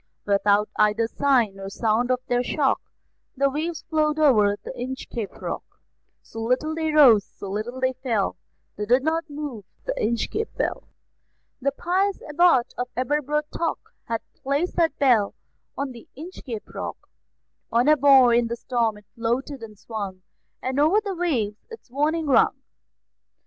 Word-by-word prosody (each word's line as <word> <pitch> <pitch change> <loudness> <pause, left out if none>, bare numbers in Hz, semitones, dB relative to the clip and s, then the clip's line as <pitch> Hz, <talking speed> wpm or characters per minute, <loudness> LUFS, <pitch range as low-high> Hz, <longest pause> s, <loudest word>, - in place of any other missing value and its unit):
Without 205 +1 +3
either 215 +2 +3
sign 235 -7 +1
or 195 0 -6
sound 225 +4 0
of 255 0 +1
their 245 0 +2
shock, 270 +2 +1 0.6
The 275 +1 +2
waves 315 +3 -3
flowed 305 -1 +1
over 215 -10 +4
the - - -6
Inchcape 245 -4 -5
Rock; - - -4 0.6
So 225 - -8
little 255 +7 0
they 320 -1 -1
rose, 255 -9 +7
so 195 0 -9
little 225 +5 -4
they 260 0 +1
fell, 245 -6 -1 0.4
They 210 0 -3
did 250 +3 +4
not 325 +1 0
move 285 -7 -6 0.2
the - - -1
Inchcape 415 - -1
Bell. - - -2 0.7
The 275 +2 +1
pious 375 +7 0
Abbot 300 -5 +3
of 250 - -1
Aberbrothock 300 +5 -1 0.3
Had 230 -1 -2 0.2
placed 285 +6 -1
that 330 -2 +2
bell 240 -7 +3 0.4
on 280 -1 -2
the 235 -2 -13
Inchcape 280 - -8
Rock; - - -5 0.7
On 240 +3 +3
a 305 - +7
buoy 265 -4 +6
in 240 - 0
the 235 - -3
storm 235 -3 -1
it 210 - -17
floated 245 +3 -2
and 215 -2 -10
swung, 200 -4 -6 0.4
And 260 +2 -1
over 320 +8 +5
the 410 -2 -4
waves 250 - -2
its 455 - -12
warning 310 +4 0
rung. 280 - +3
260 Hz, 155 wpm, -24 LUFS, 225-300 Hz, 0.7 s, rose